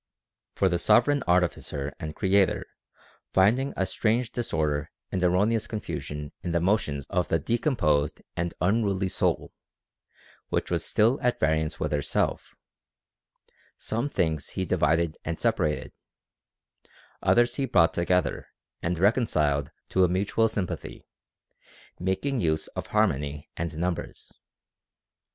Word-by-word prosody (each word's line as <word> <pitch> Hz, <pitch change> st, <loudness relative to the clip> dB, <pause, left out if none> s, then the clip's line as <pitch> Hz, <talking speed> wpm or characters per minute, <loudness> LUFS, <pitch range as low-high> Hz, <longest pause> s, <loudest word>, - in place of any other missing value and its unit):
For 95 Hz, -, +3 dB
the 90 Hz, -2 st, +1 dB
Sovereign 125 Hz, +9 st, +4 dB
Artificer 85 Hz, -5 st, 0 dB
and 75 Hz, 0 st, -6 dB
Creator 95 Hz, -1 st, +2 dB, 0.7 s
finding 115 Hz, +9 st, +3 dB
a 95 Hz, -, +1 dB
strange 115 Hz, +4 st, 0 dB
disorder 75 Hz, -11 st, -1 dB, 0.2 s
and 90 Hz, -, -1 dB
erro 90 Hz, +3 st, +4 dB
neous 115 Hz, -1 st, 0 dB
confusion 75 Hz, -, -5 dB
in 85 Hz, -, -3 dB
the 85 Hz, -, +3 dB
motions 85 Hz, -7 st, 0 dB
of 90 Hz, -2 st, +1 dB
the 80 Hz, -, +2 dB
decomposed 75 Hz, -, 0 dB
and 85 Hz, 0 st, -2 dB
unruly 100 Hz, 0 st, +1 dB
soul, -, -, -1 dB, 1.0 s
which -, -, -1 dB
was -, -, 0 dB
still 115 Hz, +5 st, +2 dB
at 125 Hz, -2 st, +1 dB
variance 80 Hz, 0 st, 0 dB
with -, -, -1 dB
herself, 70 Hz, -1 st, -1 dB, 1.2 s
some 115 Hz, +6 st, -2 dB
things 80 Hz, -, -1 dB
he 95 Hz, -, -3 dB
divided 80 Hz, -1 st, +1 dB
and 80 Hz, 0 st, -4 dB
separated, 75 Hz, -1 st, 0 dB, 1.3 s
others 120 Hz, 0 st, +3 dB
he 140 Hz, -, +1 dB
brought 85 Hz, -9 st, +4 dB
to 85 Hz, -, 0 dB
gether 90 Hz, +1 st, 0 dB, 0.3 s
and 85 Hz, +1 st, -1 dB
reconciled 75 Hz, -, +2 dB, 0.2 s
to 95 Hz, -, +3 dB
a -, -, +5 dB
mutual 100 Hz, +5 st, +1 dB
sympathy, 100 Hz, -5 st, -5 dB, 0.9 s
making 95 Hz, +9 st, -1 dB
use 80 Hz, -2 st, +2 dB
of -, -, -6 dB
harmony 70 Hz, +1 st, 0 dB
and 80 Hz, -2 st, -4 dB
numbers. 90 Hz, +1 st, -4 dB
90 Hz, 125 wpm, -27 LUFS, 80-110 Hz, 1.3 s, a